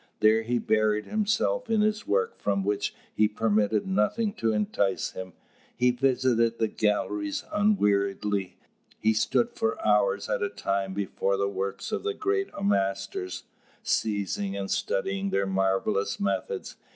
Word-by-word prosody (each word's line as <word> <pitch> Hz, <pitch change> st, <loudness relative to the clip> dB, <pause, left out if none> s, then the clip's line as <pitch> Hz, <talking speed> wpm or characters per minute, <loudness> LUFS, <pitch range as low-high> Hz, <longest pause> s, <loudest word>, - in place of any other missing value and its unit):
There 110 Hz, +1 st, +5 dB
he 120 Hz, +2 st, 0 dB
buried 110 Hz, -2 st, +1 dB
himself 215 Hz, -, 0 dB
in 220 Hz, -2 st, +3 dB
his 215 Hz, +3 st, 0 dB
work 460 Hz, +5 st, 0 dB
from 100 Hz, -1 st, 0 dB
which 100 Hz, +1 st, -1 dB, 0.2 s
he 105 Hz, -, +4 dB
permitted 105 Hz, -1 st, +1 dB
nothing 105 Hz, -, +1 dB
to 115 Hz, -, 0 dB
entice 100 Hz, -2 st, 0 dB
him. 95 Hz, -1 st, -7 dB, 0.4 s
He 125 Hz, 0 st, +3 dB
visited 125 Hz, -2 st, +2 dB
the 110 Hz, -, +1 dB
galleries 290 Hz, -, -1 dB
unweariedly, 100 Hz, -, +1 dB, 0.4 s
he 110 Hz, +1 st, +2 dB
stood 230 Hz, -, +1 dB
for 225 Hz, +5 st, -1 dB
hours -, -, +2 dB
at -, -, -1 dB
a 390 Hz, -, 0 dB
time 100 Hz, -, -2 dB
before 100 Hz, 0 st, -1 dB
the 100 Hz, 0 st, +1 dB
works 100 Hz, -, -4 dB
of 215 Hz, -, -1 dB
the 420 Hz, 0 st, -2 dB
great 400 Hz, -1 st, 0 dB, 0.2 s
masters, 95 Hz, -, -1 dB, 0.4 s
seizing 100 Hz, -2 st, -1 dB
and 100 Hz, -1 st, -4 dB
studying 95 Hz, 0 st, -1 dB
their 100 Hz, 0 st, +1 dB
marvellous 95 Hz, +1 st, 0 dB
methods. 100 Hz, -1 st, -2 dB
105 Hz, 140 wpm, -27 LUFS, -, 0.4 s, There